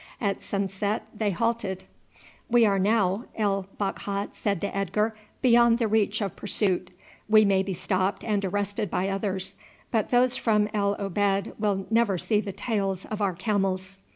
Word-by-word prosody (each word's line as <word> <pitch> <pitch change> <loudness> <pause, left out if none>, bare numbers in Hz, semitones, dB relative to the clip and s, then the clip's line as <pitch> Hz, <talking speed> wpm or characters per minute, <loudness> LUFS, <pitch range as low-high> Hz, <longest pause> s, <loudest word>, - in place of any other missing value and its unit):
At 200 -3 -1
sunset 200 +1 -2
they 210 -1 0
halted. 200 -1 -1 0.7
"We 240 -1 +5
are 200 -2 +2
now," 200 +1 +2
El 195 -3 0
Bakhat 200 0 -3
said 200 -4 -1
to 200 - -3
Edgar, 210 +3 0 0.3
"beyond 235 -2 +5
the 235 -2 +1
reach 215 0 +1
of 195 -3 -2
pursuit. 190 -3 0 0.4
We 215 0 +7
may 195 -1 +3
be 190 -1 -3
stopped 185 +2 -1
and 205 -2 0
arrested 205 +2 -1
by 185 +4 -1
others, 195 -1 -2 0.3
but 220 -3 +1
those 250 0 +3
from 210 -2 +2
El 200 -1 +1
Obeid 200 0 0
will 200 -3 0
never 225 -4 +3
see 210 +4 +1
the 205 - -5
tails 195 -2 -2
of 215 0 -3
our 195 -2 +1
camels." 195 -1 -1
200 Hz, 160 wpm, -26 LUFS, 195-215 Hz, 0.7 s, We